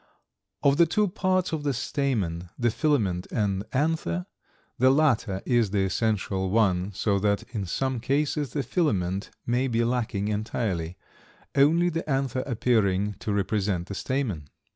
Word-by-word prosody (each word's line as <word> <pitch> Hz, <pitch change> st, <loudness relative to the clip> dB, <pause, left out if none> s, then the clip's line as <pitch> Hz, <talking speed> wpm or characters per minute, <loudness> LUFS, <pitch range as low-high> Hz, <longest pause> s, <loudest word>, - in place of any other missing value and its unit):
Of 140 Hz, -1 st, +4 dB
the 170 Hz, -, +6 dB
two 210 Hz, +6 st, +2 dB
parts 185 Hz, -1 st, 0 dB
of 155 Hz, -, -1 dB
the 145 Hz, -2 st, -1 dB
stamen, 105 Hz, -, -1 dB
the 120 Hz, -1 st, +2 dB
filament 110 Hz, -, 0 dB
and 100 Hz, -3 st, 0 dB
anther, 130 Hz, -, 0 dB, 0.5 s
the 130 Hz, +1 st, +6 dB
latter 125 Hz, -9 st, +2 dB
is 120 Hz, -4 st, +2 dB
the 100 Hz, 0 st, +1 dB
essential 95 Hz, -2 st, 0 dB
one, 95 Hz, -3 st, +2 dB
so 100 Hz, +1 st, 0 dB
that 100 Hz, 0 st, +1 dB
in 100 Hz, -5 st, -3 dB
some 130 Hz, +6 st, -1 dB
cases 140 Hz, +1 st, 0 dB
the 145 Hz, -, -1 dB
filament 100 Hz, -, 0 dB, 0.2 s
may 125 Hz, +2 st, +1 dB
be 115 Hz, -2 st, +1 dB
lacking 115 Hz, -4 st, -1 dB
entirely, 105 Hz, -5 st, -2 dB, 0.6 s
only 160 Hz, +5 st, +4 dB
the 165 Hz, -1 st, -4 dB
anther 135 Hz, -2 st, 0 dB
appearing 105 Hz, -5 st, +1 dB
to 105 Hz, -, -3 dB
represent 100 Hz, -2 st, -1 dB
the -, -, -4 dB
stamen. 100 Hz, -, -2 dB
115 Hz, 145 wpm, -26 LUFS, 95-140 Hz, 0.6 s, the